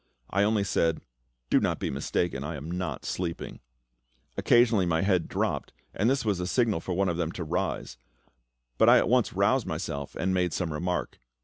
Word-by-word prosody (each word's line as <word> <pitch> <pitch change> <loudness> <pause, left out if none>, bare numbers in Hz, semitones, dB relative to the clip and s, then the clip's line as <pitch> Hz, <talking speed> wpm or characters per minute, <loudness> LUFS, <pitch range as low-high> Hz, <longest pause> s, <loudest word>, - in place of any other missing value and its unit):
I 100 - +2
only 105 0 +2
said, 80 -4 +1 0.5
"Do - - +6
not - - 0
be - - -2
mistaken; 70 +1 -1
I 75 +2 -4
am 75 +4 -6
not 90 +1 -4
sleeping." 85 -2 -4 0.8
Occasionally 120 -6 +4
my 80 +1 +1
head 95 -4 +2
dropped, - - -2 0.2
and 110 +4 +1
this 135 -3 0
was 100 -4 +1
a 90 - -2
signal 110 -3 +1
for 90 - -4
one 95 +1 +2
of 85 -2 -1
them 85 -2 -1
to 90 - -4
rise; 65 -5 -3 0.8
but - - +6
I - - +8
at - - +2
once - - +2
roused - - +2
myself 70 -1 -4
and 95 +1 0
made 90 -3 +1
some 85 -4 -2
remark. 90 +3 -3
90 Hz, 190 wpm, -28 LUFS, 80-100 Hz, 0.8 s, I